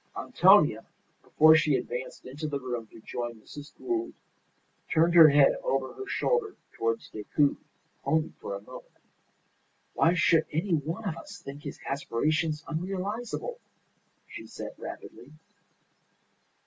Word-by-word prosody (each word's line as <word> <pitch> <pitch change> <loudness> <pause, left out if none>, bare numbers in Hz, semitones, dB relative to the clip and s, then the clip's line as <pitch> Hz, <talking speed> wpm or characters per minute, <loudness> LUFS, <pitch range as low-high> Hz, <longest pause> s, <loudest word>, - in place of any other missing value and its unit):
Antonia, - - +4 0.4
before 155 +1 +6
she 155 -2 +3
advanced 125 0 -5
into 145 +5 -5
the 145 -2 -3
room 120 -3 -5
to 115 - -15
join 120 +1 -5
Mrs. 145 +7 -12
Gould, 355 -1 -3 0.8
turned 165 +1 +3
her 165 -3 +9
head 140 -1 +5
over 135 -1 -1
her 400 - -8
shoulder 455 -3 0 0.2
towards 115 0 -2
Decoud, 140 +7 +1 0.5
only 160 0 0
for 100 - -5
a 100 - -7
moment. - - -13 1.0
"Why 165 +2 +3
should 165 -2 +3
any 170 +4 -1
one 165 +8 -2
of 165 -3 -3
us 200 +4 -10
think 140 -3 -9
his - - -8
aspirations 150 +4 -1
unrealizable?" 200 - -4 0.7
she - - -10
said, - - -7
rapidly. 135 +5 -10
155 Hz, 130 wpm, -28 LUFS, 135-175 Hz, 1.0 s, her